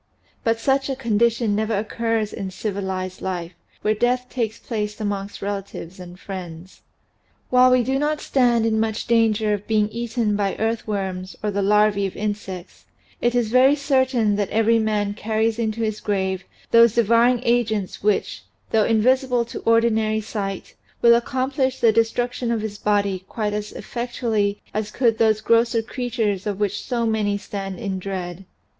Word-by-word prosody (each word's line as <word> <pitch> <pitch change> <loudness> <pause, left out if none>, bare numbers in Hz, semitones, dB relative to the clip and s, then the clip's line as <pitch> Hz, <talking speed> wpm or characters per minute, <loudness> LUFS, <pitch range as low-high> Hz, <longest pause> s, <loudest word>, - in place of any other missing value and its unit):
But 225 0 +1
such 270 +3 +1
a 270 - -1
condition 230 -2 +1
never 215 0 0
occurs 220 0 -1
in 195 - -4
civilized 190 -1 -4
life 180 -2 -4 0.3
where 215 - +3
death 245 +3 +1
takes 230 -3 -2
place 210 -2 -4
amongst 200 -2 -4
relatives 195 -3 -5
and 180 0 -10
friends. 185 -2 -8 0.7
But - - -1
while 255 0 +7
we 255 -1 +4
do 265 +3 0
not 300 +1 0
stand 240 -4 +2
in 220 -1 +1
much 220 0 -1
danger 220 -2 +2
of 205 0 -4
being 215 -1 +2
eaten 230 -2 -1
by 200 -2 0
earthworms 200 -4 -3
or 210 - 0
the 200 0 -1
larvae 205 0 +3
of 190 - -9
insects, 200 -4 -5 0.4
it 240 0 +1
is 235 -3 +1
very 260 +3 +6
certain 260 -7 +1
that 205 -2 -1
every 225 +1 +3
man 210 -2 0
carries 220 +1 -1
into 225 0 -1
his 215 -1 -2
grave 190 -3 -1 0.3
those 230 -1 +6
devour 235 +1 +4
ing 250 -1 +2
agents 220 -5 0
which 210 0 0 0.3
though 220 -1 +3
invisible 250 +2 +2
to 235 - -7
ordinary 225 -1 +3
sight 200 -3 -5 0.3
will 235 0 +8
accomplish 260 +2 0
the 230 - +5
destruction 235 +2 0
of 230 -2 0
his 210 -1 -5
body 200 -3 0
quite 210 -2 -2
as 210 0 -4
effectually 225 -4 -2
as 215 0 -2
could 230 -1 +1
those 220 -1 +3
grosser 230 0 +2
creatures 225 -5 -2
of 205 -1 -3
which 205 0 -1
so 235 -2 -1
many 215 -2 0
stand 195 -1 -6
in 195 -5 -3
dread. 185 -1 -5
220 Hz, 165 wpm, -22 LUFS, 200-235 Hz, 0.7 s, will